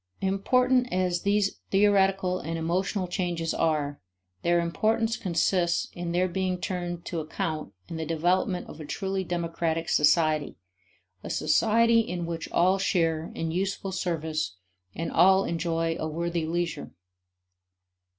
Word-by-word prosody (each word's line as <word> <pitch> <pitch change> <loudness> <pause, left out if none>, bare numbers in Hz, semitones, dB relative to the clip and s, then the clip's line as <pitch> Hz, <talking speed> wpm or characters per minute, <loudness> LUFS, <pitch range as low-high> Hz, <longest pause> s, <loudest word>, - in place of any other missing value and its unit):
Important 250 +6 +2
as 180 -1 0
these 200 0 +1
theoretical 195 -2 +3
and 165 +1 -4
emotional 185 +4 -1
changes 175 -3 -2
are, 150 -3 0 0.4
their 175 0 +3
importance 220 +7 +1
consists 175 -3 +1
in 175 -1 -4
their 180 +2 +2
being 185 0 -1
turned 175 -2 -4
to 170 - -3
account 155 -4 -3 0.2
in 165 - -6
the 160 - -3
development 180 +4 +1
of - - -10
a - - -7
truly 190 +4 -2
democratic 165 -2 -2
society, 155 -1 +3 0.7
a - - -6
society 230 +1 +3
in 180 -6 -2
which 165 -1 -5
all 185 +3 +3
share 165 -4 0
in 165 0 -2
useful 190 +2 -2
service 160 - -2 0.4
and 165 - -3
all 190 +3 +5
enjoy 165 -1 -1
a 155 - -2
worthy 170 +1 -2
leisure. 170 -2 -2
175 Hz, 130 wpm, -27 LUFS, 165-190 Hz, 0.7 s, all